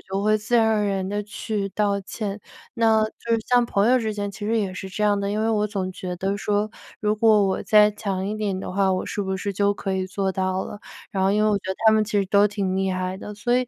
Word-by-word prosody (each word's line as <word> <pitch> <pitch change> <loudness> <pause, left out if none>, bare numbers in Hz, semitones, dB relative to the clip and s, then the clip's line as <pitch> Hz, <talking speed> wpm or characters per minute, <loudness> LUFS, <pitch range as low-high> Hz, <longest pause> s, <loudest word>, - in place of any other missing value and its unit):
就 195 +1 -4
会 215 +1 +3
自 220 +3 0
然 225 -1 +4
而 215 -1 +2
然 195 -2 -1
地 205 +1 -2
去 205 0 -4
道 200 0 0
歉。 200 +1 -5 0.3
那 220 -2 +3
就 225 +2 -8
是 230 - +3
像 245 -1 +4
朋 205 -1 +1
友 255 - +5
之 220 -2 -2
间 205 -1 -3
其 205 +1 -8
实 225 +2 +1
也 190 -3 -2
是 190 - -6
这 210 +3 -2
样 205 -1 +2
的， 200 0 -2
因 210 +1 -1
为 220 - +1
我 210 -2 +1
总 195 -3 -3
觉 180 -1 -5
得 195 +3 -1
说 205 +1 0 0.3
如 210 0 +1
果 215 -2 +4
我 190 - -1
再 210 -1 +6
强 195 -2 -3
一 210 - -2
点 200 -3 -2
的 185 - -6
话， 195 0 +2
我 185 - -2
是 205 - -3
不 190 0 -2
是 200 +1 -3
就 200 +1 +2
可 195 -1 -4
以 185 0 -1
做 195 0 -1
到 185 0 -1
了？ 205 - -8 0.3
然 190 -1 0
后 190 - +3
因 210 +1 +2
为 215 - +4
我 205 - +2
觉 190 - -6
得 190 - -3
他 220 - +8
们 215 0 +4
其 210 -1 0
实 195 - 0
都 205 +2 +4
挺 195 -2 -2
厉 190 0 0
害 185 0 -2
的。 210 - -8
所 240 +4 +1
以 255 - +1
205 Hz, 305 characters per minute, -23 LUFS, 190-215 Hz, 0.3 s, 他